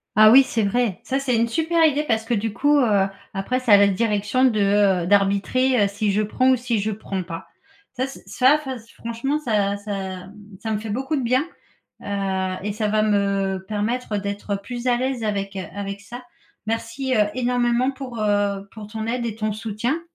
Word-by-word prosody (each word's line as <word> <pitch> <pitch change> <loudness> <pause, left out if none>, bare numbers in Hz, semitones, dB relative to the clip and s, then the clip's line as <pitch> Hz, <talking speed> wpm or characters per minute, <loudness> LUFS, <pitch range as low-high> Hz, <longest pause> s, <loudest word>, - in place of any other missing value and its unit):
Ah 215 +1 +8
oui, 265 +3 +9
c'est 230 -4 -1
vrai! 205 -2 0
Ça, 265 +1 -1
c'est 265 -3 0
une 230 +1 +2
super 325 +6 +2
idée 300 -1 +2
parce 225 -6 0
que 240 - -1
du 220 0 -1
coup, 290 +6 +3
heu, 205 -6 +3 0.3
après 225 +7 -1
c'est 255 -3 0
à 205 - +10
la 200 0 +5
direction 210 +3 +1
de, 205 -5 +3
heu, - - -3
d'arbitrer, 205 +5 +3
heu, - - +3
si 205 +1 -1
je 205 +2 +1
prends 255 +5 +1
ou - - +5
si 240 -2 -1
je 210 +2 -1
prends 200 -2 -4
pas. 165 -1 -7 0.5
Ça 260 +1 -2
c 270 - -11
ça 265 +4 +3
ça 265 -1 -3 0.2
franchement 235 +5 -2
ça 205 -7 0
ça 205 +1 -8 0.3
m 190 - -14 0.3
ça 220 - -3
me 210 - -1
fait 220 +1 -7
beaucoup 265 +8 -2
de 275 - -1
bien, 255 +4 +1 0.6
heu, 190 -2 -2
et 205 +1 -2
ça 215 0 -1
va 215 +1 +2
me 200 -2 0
permettre 215 +2 -2
d'être 200 0 -3
plus 240 +5 -7
à 245 - +3
l'aise 255 -2 -2
avec, 200 -2 -2
heu, 190 - -3
avec 200 0 -5
ça. 240 +5 -9 0.4
Merci, 230 +4 -2
heu, 210 -1 +4
énormément 245 0 +1
pour, 260 -4 -7
heu, 205 -1 0
pour 215 -2 -9
ton 220 0 -5
aide 240 +1 -2
et 230 -2 -3
ton 215 -1 -1
soutien. 220 +8 -2
220 Hz, 210 wpm, -22 LUFS, 200-250 Hz, 0.6 s, à